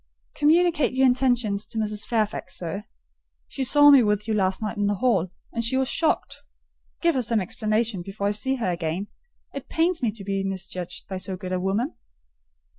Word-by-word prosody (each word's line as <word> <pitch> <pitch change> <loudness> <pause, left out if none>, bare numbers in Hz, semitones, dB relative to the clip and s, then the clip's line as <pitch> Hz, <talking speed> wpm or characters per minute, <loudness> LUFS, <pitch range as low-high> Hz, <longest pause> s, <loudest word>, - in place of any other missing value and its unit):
"Communicate 315 -1 +3
your 265 0 +4
intentions 245 -5 +2
to 230 - -8
Mrs. 210 -1 -2
Fairfax, 220 -3 -1
sir: 180 +4 -5 0.6
she 270 - -4
saw 290 +3 +6
me 275 -2 +8
with 210 -1 0
you 220 - 0
last 190 -2 +1
night 215 0 -3
in 205 -1 0
the 205 - +1
hall, 195 -5 +1 0.2
and 230 - -2
she 235 +3 +1
was 265 -1 +1
shocked. 320 -1 0 0.6
Give 335 -1 +3
her 260 - +1
some 230 -1 +1
explanation 215 +1 -1
before 195 +3 -5
I 205 - +2
see 260 +6 0
her 225 -8 -1
again. 170 +3 -3 0.4
It 275 - -7
pains 335 +1 +1
me 240 - +2
to 210 -2 -9
be 195 0 -2
misjudged 185 -2 -5
by 190 -1 -4
so 185 0 -3
good 185 0 -5
a 185 - 0
woman." 200 - -1
215 Hz, 190 wpm, -25 LUFS, 195-260 Hz, 0.6 s, me